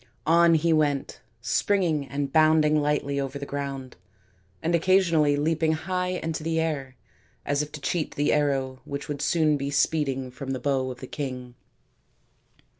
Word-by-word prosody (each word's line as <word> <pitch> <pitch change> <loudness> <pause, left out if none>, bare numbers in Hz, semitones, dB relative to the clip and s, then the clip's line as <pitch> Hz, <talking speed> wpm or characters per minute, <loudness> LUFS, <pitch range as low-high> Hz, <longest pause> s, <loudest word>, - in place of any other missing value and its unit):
On 170 +1 +5
he 165 +1 +2
went, 145 -3 0 0.2
springing 160 +1 +1
and 140 +1 -3
bounding 155 -1 +4
lightly 145 -1 0
over 135 0 -3
the 140 - -6
ground, 140 -2 -5 0.7
and 170 - 0
occasionally 170 -4 +3
leaping 160 +2 +1
high 180 +3 -2 0.2
into 160 -1 -3
the 165 +1 -1
air 140 -5 -2 0.5
as 145 0 +1
if 150 0 -5
to 150 - -6
cheat 165 0 -2
the 145 - +1
arrow 135 -3 0
which 140 0 -6
would 145 -1 -4
soon 155 -3 +2
be 140 0 -3
speeding 140 -3 0
from 135 +1 -5
the 130 - -3
bow 130 0 0
of 125 -1 -8
the - - -5
king. 125 -4 -5
145 Hz, 160 wpm, -26 LUFS, 140-160 Hz, 0.7 s, On